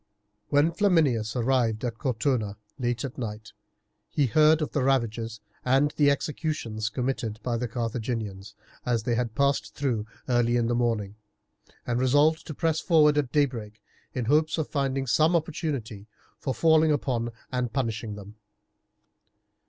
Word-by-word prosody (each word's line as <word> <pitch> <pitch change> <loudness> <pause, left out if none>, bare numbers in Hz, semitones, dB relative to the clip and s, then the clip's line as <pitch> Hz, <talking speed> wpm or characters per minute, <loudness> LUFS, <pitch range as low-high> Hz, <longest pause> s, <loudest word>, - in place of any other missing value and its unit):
When 145 +3 +3
Flaminius 155 - +2
arrived 120 -2 +1
at 115 -1 -4
Cortona 115 -5 -1 0.2
late 120 -2 -1
at 130 - -7
night 110 -2 -6 0.6
he 145 - +1
heard 155 +5 +5
of - - -4
the 145 - 0
ravages 115 -4 0 0.2
and 135 +4 +2
executions 140 -6 0
committed 115 -2 -3
by 120 -2 -1
the 120 +1 -2
Carthaginians, 110 -4 -4 0.3
as 120 -3 0
they 120 - 0
had 115 -1 -1
passed 140 -6 +1
through 120 -7 -1 0.2
early 120 -1 +2
in 120 - +1
the 120 - 0
morning, 115 -4 -1 0.7
and 120 0 0
resolved 145 +5 +3
to 155 - -6
press 160 +1 +1
forward 155 -4 +4
at 145 -4 0
daybreak 115 -7 -1 0.4
in 125 -3 -1
hopes 155 +6 +2
of 160 - -1
finding 135 -2 -1
some 155 +7 +3
opportunity 145 - -3 0.3
for 130 - -2
falling 160 -1 +4
upon 125 -5 0 0.2
and 125 -2 -1
punishing 115 -5 -2
them. 105 +1 -11
125 Hz, 145 wpm, -27 LUFS, 110-145 Hz, 0.7 s, heard